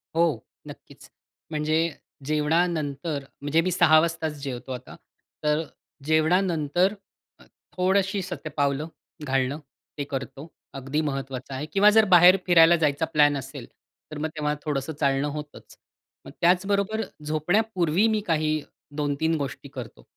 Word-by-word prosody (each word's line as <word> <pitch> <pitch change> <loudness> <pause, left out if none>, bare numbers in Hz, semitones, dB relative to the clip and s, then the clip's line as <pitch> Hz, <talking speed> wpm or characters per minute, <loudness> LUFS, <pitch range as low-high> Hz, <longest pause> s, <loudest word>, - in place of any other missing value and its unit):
हो, 165 -7 +2 0.3
नक्कीच. - - -13 0.4
म्हणजे 155 +2 +1 0.4
जेवणानंतर 155 -1 0 0.2
म्हणजे 150 +3 +2
मी 185 - -1
6:00 160 -3 +5
वाजताच 160 -2 -2
जेवतो 130 -1 -6
आता, 125 0 -8 0.5
तर 150 +1 +1 0.4
जेवणानंतर 165 +2 +2 0.5
अ, - - -17 0.3
थोडशी 190 +2 +1
शतपावलं 145 -3 -2 0.4
घालणं 135 +1 0 0.4
ते 145 - -2
करतो. 135 +2 -6 0.3
अगदी 135 +3 -2
महत्वाचं 135 -3 -4
आहे 135 +3 -4
किंवा 205 +1 +6
जर 220 0 +5
बाहेर 180 0 +7
फिरायला 170 -1 +6
जायचा 155 -1 +1
प्लॅन 145 -1 +4
असेल, 135 - -8 0.5
तर 155 - -6
मग 155 +1 -2
तेव्हा 150 -1 -1
थोडंसं 145 +1 -3
चालणं 140 0 +1
होतच. 150 0 -8 0.5
मग - - -10
त्याचबरोबर 200 +4 +2 0.2
झोपण्यापूर्वी 175 +4 +1
मी 220 -1 +1
काही 155 -2 +1 0.3
2-3 150 +2 0
गोष्टी 140 -2 -5
करतो, - - -9
155 Hz, 125 wpm, -25 LUFS, 145-175 Hz, 0.5 s, बाहेर